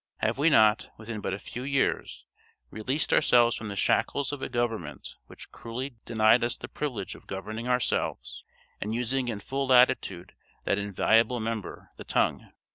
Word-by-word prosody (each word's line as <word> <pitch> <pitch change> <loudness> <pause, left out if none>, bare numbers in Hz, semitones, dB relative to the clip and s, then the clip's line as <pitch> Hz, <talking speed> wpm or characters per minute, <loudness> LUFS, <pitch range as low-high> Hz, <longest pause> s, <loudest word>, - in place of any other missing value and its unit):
Have 115 +4 -1
we 155 +3 +5
not, 110 -6 +4
within 110 -1 -6
but - - -3
a 95 - -2
few 120 - -8
years, 135 0 -1 0.5
released 130 +8 -1
ourselves 120 -1 +5
from 110 - -6
the 100 - -5
shackles 140 +8 +1
of 145 -2 -6
a - - -3
government 115 - -3
which - - -12
cruelly 125 +2 -6
denied 110 +1 +4
us 120 0 0
the - - -8
privilege 120 -10 -4
of - - -15
governing 110 +5 -5
ourselves, 65 - -1 0.4
and 110 +2 -2
using 125 +2 -1
in 110 -4 -3
full 135 +6 -3
latitude 125 -8 +3 0.3
that 100 - +1
invaluable 110 +4 +2
member, 110 -2 -5
the - - -8
tongue? - - 0
115 Hz, 165 wpm, -27 LUFS, 105-125 Hz, 0.5 s, we